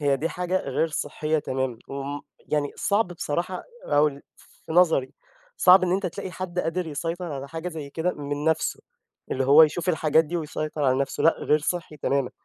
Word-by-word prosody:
هي 140 -2 +2
دي 160 +4 -1
حاجة 180 +1 -1
غير 140 +4 0
صحية 155 0 -1
تمامًا، 130 -4 -2
وامم 140 +1 -4 0.3
يعني 145 -1 0
صعب 205 0 +2
بصراحة 175 +1 -3 0.2
أو 145 +1 +4 0.6
في - - -5
نظري، 165 -6 +3 0.4
صعب 185 +1 +7
إن 180 -1 +1
أنت 190 0 0
تلاقي 190 +2 -5
حد 180 -1 -5
قادر 180 +1 -1
يسيطر 165 +3 -4
على 140 0 -6
حاجة 165 +4 -5
زي 155 -4 -7
كده 165 +5 -1
من 145 0 -4
نفسه، 160 0 0 0.5
اللي 130 - 0
هو 145 +4 +8
يشوف 160 +3 +2
الحاجات 160 -2 +3
دي 165 +3 -3
ويسيطر 155 -2 -3
على 130 0 +3
نفسه 140 - -2
لأ 165 - +5
غير 150 - +2
صحّي 160 0 -3
تمامًا 140 -2 0
155 Hz, 185 wpm, -25 LUFS, 145-175 Hz, 0.6 s, هو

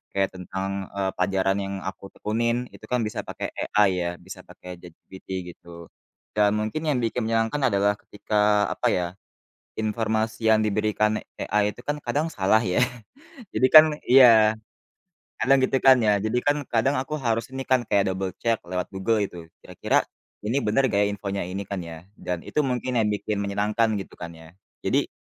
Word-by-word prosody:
kayak 95 -1 +1
tentang, 95 +1 -4
e - - -4 0.2
pelajaran 95 +1 +1
yang 95 0 -5
aku 95 +1 -6
tekunin 115 +3 -1
itu - - -13
kan, 125 -1 +1
bisa - - -5
pakai - - -4 0.3
AI 105 -2 +6
ya, 85 - -1
bisa - - -11
pakai 90 -1 -11
ChatGPT 90 +2 -15 0.3
gitu. 85 -1 -13 0.5
Dan 105 0 +4
mungkin 110 +10 -3
yang 145 -5 +1
bikin 115 0 -1
menyenangkan 115 +4 0
adalah 100 0 +2
ketika 105 0 0
apa - - -1
ya, 90 -1 0 0.7
informasi 110 0 0
yang 110 - +4
diberikan 105 0 +1 0.2
AI 105 0 +1
itu - - -14
kan, 145 0 -1
kadang 155 +3 0
salah 110 -4 +2
ya. 90 -5 0 0.7
Jadi 130 - +4
kan 155 0 +12 0.2
iya, 115 -4 +7 0.8
kadang 135 +1 +4
gitu 135 - +1
kan 130 -1 +8
ya. 105 - +5
Jadi 115 +3 0
kan, 145 0 +3 0.2
kadang 125 +5 +2
aku 150 +3 -5
harus 115 -1 -1
ini 135 0 -4
kan, 130 -2 +3
kayak 100 -1 +2
double 95 0 -3
check 115 -1 0
lewat 90 0 -3
Google 105 +4 +1
gitu 85 -3 -8 0.2
kira-kira - - 0 0.4
ini 125 +6 +1
bener 130 +6 +3
gak 100 0 +1
ya, - - +1
infonya 100 -1 -4
ini 95 +2 -4
kan 100 -2 -4
ya, 85 +1 -10
dan 90 -2 -4
itu 150 - 0
mungkin 125 -1 -2
yang 105 - +1
bikin 105 0 -2
menyenangkan 105 +3 0
gitu - - -10
kan 85 -1 -6
ya. 80 +1 -15 0.3
Jadi - - +1
105 Hz, 175 wpm, -24 LUFS, 95-115 Hz, 0.8 s, kan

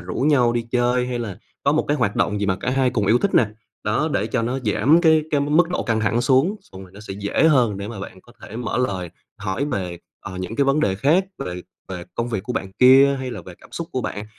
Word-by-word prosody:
rủ 90 +1 -7
nhau 130 -4 +3
đi 120 -1 -1
chơi 125 0 +1
hay 125 -1 -3
là 105 -6 -5 0.3
có 140 - +3
một 155 - +1
cái 145 - +2
hoạt 110 -6 0
động 105 0 0
gì 100 - 0
mà 95 -2 +1
cả 125 - -1
hai 130 -1 +2
cùng 105 -5 -1
yêu 120 +3 +4
thích 200 - -1
nè, 115 - +5 0.4
đó, 110 +9 0
để - - 0
cho 120 -3 -1
nó 125 +3 -1
giảm 145 +10 +3
cái 160 -2 +4
cái 145 -2 +2
mức 155 +4 +3
độ - - -1
căng 115 -2 0
thẳng 110 +3 +1
xuống, 135 - +2
xong 95 0 -13
rồi 90 - -14
nó 100 - -11
sẽ 105 -2 -7
dễ 100 +9 +1
hơn 120 -9 +3
để 100 +1 -6
mà 110 -4 -7
bạn 95 -1 -9
có 120 - -20
thể 110 - -9
mở 125 0 -2
lời, 95 -8 -2 0.3
hỏi 100 +7 -2
về, 95 - -3 0.2
ờ, 95 - -8
những 95 +5 -5
cái 140 - +3
vấn 135 +3 +2
đề 95 -9 +1
khác, 150 - +2
về 90 -9 -5 0.3
về 90 -2 -6
công 115 +1 -2
việc 110 -5 -3
của 125 - -4
bạn 95 -4 -4
kia 135 +3 +6
hay 130 -1 -4
là - - -7
về 90 - -11
cảm - - -18
xúc 170 -1 -5
của 130 - -1
bạn. 105 -3 -5
120 Hz, 275 wpm, -22 LUFS, 100-135 Hz, 0.4 s, kia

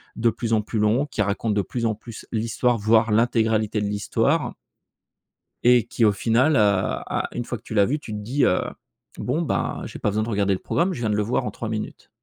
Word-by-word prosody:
de 115 +1 +2
plus 115 0 -2
en 110 - +3
plus 110 - -5
longs, 110 +7 +2
qui 110 -6 -1
racontent 100 +3 -1
de 100 - +1
plus 120 +2 -3
en 110 - -1
plus 110 +1 -11
l'histoire, 115 +2 0
voire 110 +1 +3
l'intégralité 110 -2 +2
de 105 - -1
l'histoire 100 -1 0 1.1
et 120 -2 +5
qui 115 - +1
au 105 - +5
final 120 +9 +2
heu - - +4
a 100 -2 +1
une 120 - -3
fois 120 - -4
que - - -22
tu - - -8
l'as 100 -2 +4
vu 145 +6 -1
tu 110 - -8
te - - -3
dis, 120 +7 0
heu: 90 - +3 0.6
«Bon, - - -1
bah, - - -1
j'ai - - -8
pas - - 0
besoin 110 +2 0
de 115 - -4
regarder 100 -2 +1
le 95 - -2
programme, 180 +4 0
je 130 - -6
viens 110 - 0
de 105 - +1
le 105 - +1
voir 125 +3 -1
en - - -3
3 115 - -5
minutes». 110 -1 -5
110 Hz, 240 wpm, -23 LUFS, 105-120 Hz, 1.1 s, et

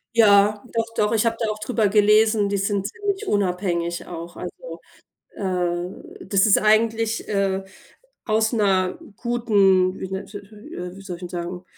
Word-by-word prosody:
Ja, 205 -2 +5
doch, 230 0 +1
doch, 210 0 +1
ich 225 0 +2
habe 230 0 +1
da 225 -2 -1
auch 215 - -6
drüber 220 0 0
gelesen, 210 0 +4
die 200 - 0
sind 200 0 -1
ziemlich 405 - -4
unabhängig 180 -3 -1
auch, 170 0 -8
also, - - -8 0.5
äh, 180 -1 -4
das 195 +2 +3
ist 205 - +5
eigentlich, 225 +1 +1
äh, 195 -1 0 0.6
aus 220 0 +1
'ner 190 -5 +1 0.2
guten 200 -6 +2
wie 190 - -5
nennt 190 +1 -5
si 205 0 -7
si 205 +1 -14
äh, 180 0 -6
wie 195 - -11
soll 180 -3 -6
ich - - -18
denn 180 - -6
sagen, 175 +1 -5
200 Hz, 170 wpm, -22 LUFS, 185-220 Hz, 0.6 s, Ja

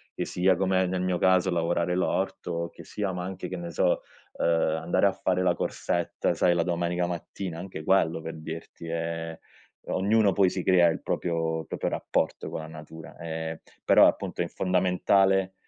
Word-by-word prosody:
che - - -2
sia 95 +1 +2
come 95 0 +2
nel 90 0 -1
mio 90 -1 0
caso, 95 0 +3
lavorare 85 +1 0
l'orto, 90 -2 -1
che - - -13
sia 100 -2 -3
ma 90 0 -4
anche, 95 0 -5
che 95 - -4
ne 85 -1 -6
so, 85 - +1 0.4
uhm, - - +1
andare 80 +2 +2
a 100 - +2
fare 95 -1 0
la - - +3
corsetta, 85 -1 -1
sai, 85 -1 +3
la 85 - +2
domenica 85 0 0
mattina, 85 0 -5
anche 90 -3 -7
quello 80 -3 +2
per 80 0 -6
dirti 80 +1 -8
è 80 0 -3 0.5
ognuno 100 +2 +3
poi 95 -3 +4
si 90 - -3
crea 90 -2 +5
il 80 - -3
proprio- 80 -1 -1
proprio - - -2
rapporto - - -1
con - - -4
la 80 - -8
natura, 80 0 -11
ehm, 80 0 -4 0.3
però, - - +7
appunto, - - -1
è - - 0
fondamentale, 95 +1 +2
90 Hz, 175 wpm, -27 LUFS, 80-95 Hz, 0.5 s, però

